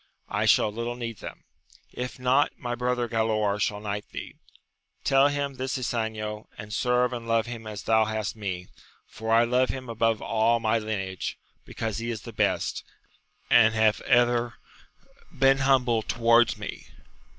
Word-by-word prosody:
I - - 0
shall 105 - +4
little 115 +2 -4
need 115 -3 -6
them: - - -9 0.5
if 125 0 -5
not, 130 +3 +2
my 120 0 -4
brother 125 0 -1
Galaor 110 -3 0
shall 105 0 0
knight 105 0 -5
thee. - - -7 0.7
Tell 135 0 +5
him 145 -1 -2
this 130 +1 -2
Ysanjo, 110 -3 -3
and 105 0 -8
serve 125 +1 +1
and 115 -1 -6
love 115 -1 +2
him 115 -2 -7
as 105 -2 -6
thou 110 -1 +3
hast 110 0 -3
me, 95 -4 -4 0.4
for 110 0 -5
I 115 +1 +6
love 125 +2 +2
him 130 -2 -5
above 115 -1 +1
all 115 +1 +2
my 115 0 +1
lineage, 95 -4 -4 0.3
because 110 -2 -4
he 115 +1 -4
is 110 -3 -4
the 115 - -9
best, - - 0 0.7
and 115 -1 +6
hath 110 -1 +3
ever 120 -1 +2 0.8
been 135 +1 +3
humble 130 -4 +3
towards 115 +1 +3
me. - - -7
115 Hz, 160 wpm, -26 LUFS, 110-125 Hz, 0.8 s, I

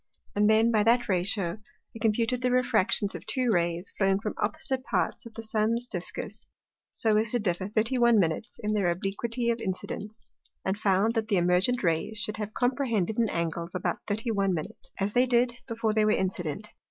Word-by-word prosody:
And 210 +1 +4
then, 220 +2 +4
by 215 -2 +3
that 235 +3 +3
ratio, 185 0 0 0.4
I - - -7
computed 230 +3 +1
the 250 - +2
Refractions 245 -5 +2
of 175 -2 -7
two 255 -3 +1
Rays 170 0 -1
flowing 195 -1 +3
from 210 0 -3
opposite 255 +5 -1
parts 250 - -1
of 225 - -15
the 225 - -6
Sun's 220 +2 0
discus, 180 -7 -5 0.4
so 220 -2 +2
as 220 +1 0
to 245 - +2
differ 185 -3 -1
31' 230 +1 +3
in 210 +5 -3
their 200 -4 +2
obliquity 230 +7 -1
of 235 - -3
Incidence, 205 +3 -5 0.3
and 190 - +1
found 200 +2 +3
that 225 -2 -1
the 205 -3 +2
emergent 180 +8 +2
Rays 165 +5 0
should 210 +2 -1
have 215 0 -5
comprehended 240 -5 0
an 225 -2 +2
Angle 170 0 -2
of 170 - -13
about 185 - -1
31', 205 -3 0 0.4
as 200 +1 -1
they 250 +1 +4
did, 240 0 +3
before 225 -2 -1
they 215 0 +3
were 215 - +3
incident. 190 -1 -1
215 Hz, 180 wpm, -28 LUFS, 190-230 Hz, 0.4 s, And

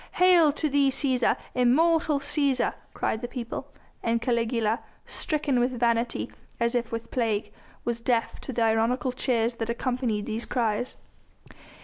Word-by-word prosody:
Hail 355 -4 +6
to 305 - -1
thee 280 -1 +3
Cæsar! 260 -2 +2 0.2
Immortal 300 +5 +3
Cæsar!" 280 -2 +1 0.2
cried 220 - -1
the 245 - -3
people, 240 -1 -5 0.3
and 230 0 +1
Caligula, 230 -1 0 0.3
stricken 290 -5 -1
with 245 0 0
vanity 235 0 0 0.3
as 235 0 +1
if 235 -1 -1
with 230 0 -5
plague, 225 -4 -1 0.3
was 235 -1 -2
deaf 230 -1 0
to - - -6
the 235 -2 0
ironical 225 +3 +2
cheers 245 -2 0
that 230 -1 -4
accompanied 235 -3 -1
these 225 +2 -3
cries. 235 0 -1
245 Hz, 140 wpm, -27 LUFS, 230-265 Hz, 0.3 s, Hail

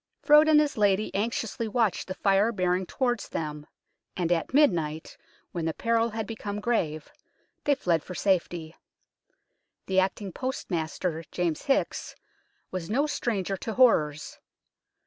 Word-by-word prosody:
Frowde 300 +1 +7
and 305 -1 +7
his 295 -4 0
lady 205 0 +2
anxiously 225 +2 -2
watched 220 -2 0
the 185 - -4
Fire 195 +3 +3
bearing 185 -3 0
towards 245 -4 -1
them, 150 -1 -5 0.5
and 175 -2 0
at 170 -2 0
midnight, 170 - +1 0.4
when 170 -2 -3
the 160 - -1
peril 230 0 +1
had 220 -1 -4
become 210 -2 -5
grave, 170 -10 -1 0.5
they 285 - +4
fled 170 - +1
for 180 - -8
safety. 175 -4 0 1.1
The 190 0 +2
acting 190 +1 -1
postmaster, 170 -8 -3
James 170 -4 -2
Hickes, 275 - 0 0.6
was 185 -2 -5
no 270 +7 +2
stranger 215 - -1
to 225 - -5
horrors. 150 - +3
195 Hz, 135 wpm, -27 LUFS, 170-230 Hz, 1.1 s, Frowde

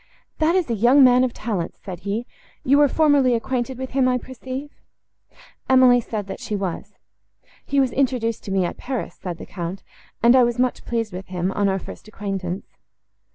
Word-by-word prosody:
"That 320 +3 +3
is 370 -3 +1
a 235 - -1
young 245 +6 +5
man 250 0 +6
of 255 - +1
talents," 205 -8 -4
said 185 -4 -8
he; 205 +5 -3 0.4
"you 280 +3 +4
were 295 - +6
formerly 285 -4 +3
acquainted 250 +2 -2
with 260 0 -6
him, 260 -1 +2
I 250 0 +2
perceive." 260 +3 -7 1.0
Emily 255 -2 +6
said, 215 -3 -4
that 195 - -7
she 210 - -4
was. 190 -4 -4 0.7
"He 280 - +1
was 265 -2 +2
introduced 245 -4 0
to 195 - -5
me, 190 -2 +2
at - - -4
Paris," 255 -2 -5
said 175 -3 -5
the - - -9
Count, 180 +1 -6 0.4
"and 240 +2 +7
I 260 - +7
was 240 0 0
much 250 0 0
pleased 230 -4 -2
with 185 +1 -7
him, 185 0 -2
on 200 0 +1
our 190 - 0
first 195 - -10
acquaintance." 195 -3 -4
240 Hz, 195 wpm, -22 LUFS, 195-260 Hz, 1.0 s, and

